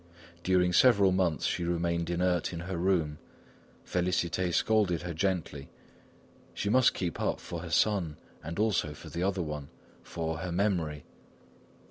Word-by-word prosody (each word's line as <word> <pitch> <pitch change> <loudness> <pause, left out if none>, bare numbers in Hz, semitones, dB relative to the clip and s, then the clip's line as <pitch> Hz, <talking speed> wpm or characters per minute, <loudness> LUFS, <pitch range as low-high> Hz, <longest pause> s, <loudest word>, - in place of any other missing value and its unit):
During 90 -1 +3
several 100 -4 +5
months 90 -4 +1
she 90 - 0
remained 85 0 -1
inert 90 -1 +1
in 85 - -5
her 90 +1 -4
room. 85 -4 +1 0.7
Félicité 90 0 0
scolded 100 -3 +2
her 85 -1 -4
gently; 80 -5 -2 0.9
she 100 - -2
must 130 +1 +4
keep 85 -4 -3
up - - 0
for 85 - -6
her 85 0 -7
son 85 -5 +1 0.3
and 85 +3 -6
also 100 -8 +1
for - - -11
the 85 - -3
other 95 -1 0
one, 75 -2 -5 0.3
for 80 -1 -4
"her 90 +1 -4
memory." 85 -6 -1
85 Hz, 145 wpm, -30 LUFS, 85-95 Hz, 0.9 s, several